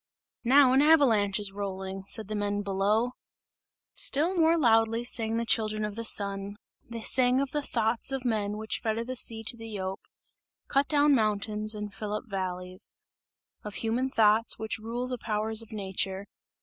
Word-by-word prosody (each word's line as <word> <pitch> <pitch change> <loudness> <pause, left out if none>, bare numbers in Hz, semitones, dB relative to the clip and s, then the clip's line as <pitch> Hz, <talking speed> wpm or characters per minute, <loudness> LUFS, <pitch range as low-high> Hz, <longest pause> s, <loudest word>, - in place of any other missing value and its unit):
"Now 260 +1 +5
an 265 - +5
avalanche 240 -11 +4
is 205 -2 -4
rolling!" 195 -1 -6
said 215 -1 +1
the 215 - -5
men 205 0 -2
below. 205 +5 +1 0.8
Still 320 +7 -1
more 330 -1 +3
loudly 225 -4 +3
sang 225 -2 +1
the 235 - -1
children 215 -2 +1
of 210 -1 -6
the 230 - -4
Sun; 200 -2 +1 0.3
they 230 -1 -6
sang 255 +2 +3
of 275 -1 -1
the 295 - -1
"thoughts" 230 -1 0
of 265 -1 -4
men 210 -3 -1
which 220 0 -3
fetter 225 0 -2
the 255 +2 -6
sea 225 -2 +3
to 230 - -1
the 225 -1 -9
yoke, 190 -2 -6 0.6
cut 275 0 +1
down 290 -1 +4
mountains 215 -2 +1
and 210 -1 -6
fill 210 -1 -5
up 210 - -3
valleys; 185 -2 -5 0.7
of 210 -2 -8
human 235 +6 -1
thoughts 220 -2 +3
which 220 0 -4
rule 235 +3 -4
the 250 -1 -5
powers 220 0 0
of 225 - -11
nature. 195 -1 -3
220 Hz, 175 wpm, -28 LUFS, 205-245 Hz, 0.8 s, Now